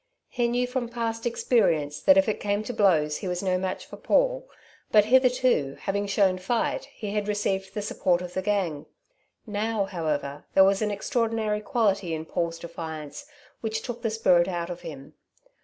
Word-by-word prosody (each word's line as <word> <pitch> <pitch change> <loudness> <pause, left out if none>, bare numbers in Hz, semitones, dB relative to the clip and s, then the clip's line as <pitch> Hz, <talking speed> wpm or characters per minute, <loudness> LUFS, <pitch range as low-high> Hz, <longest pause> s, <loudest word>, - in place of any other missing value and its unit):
He 240 -1 0
knew 245 +1 +1
from 250 -1 -3
past 230 -1 -2
experience 165 - +1
that 285 0 +6
if 290 - +4
it 215 - -1
came 205 +1 -1
to 245 - -5
blows 160 -9 +3
he 195 - -5
was 180 +1 -2
no 185 -1 +1
match 185 0 -3
for - - -11
Paul, - - +1 0.4
but 210 -1 +6
hitherto, 250 - +3
having 200 +1 -2
shown 195 -2 +2
fight, 225 +6 -1
he 210 -3 -7
had 210 0 -1
received 195 -2 -1
the 210 - -2
support 180 -4 +1
of 180 0 -7
the 190 - -1
gang. 185 -7 -1 0.6
Now, 215 -1 -1
however, 150 -6 -3
there 190 - +8
was 195 +1 +3
an 215 - +1
extraordinary 220 0 -1
quality 200 - 0
in 160 0 -6
Paul's 170 0 -2
defiance 160 - -7 0.3
which 220 -1 -3
took 240 -1 -6
the 230 - 0
spirit 185 -6 +3
out 175 -1 -3
of 175 - -7
him. 150 -3 -9
200 Hz, 180 wpm, -26 LUFS, 175-225 Hz, 0.6 s, there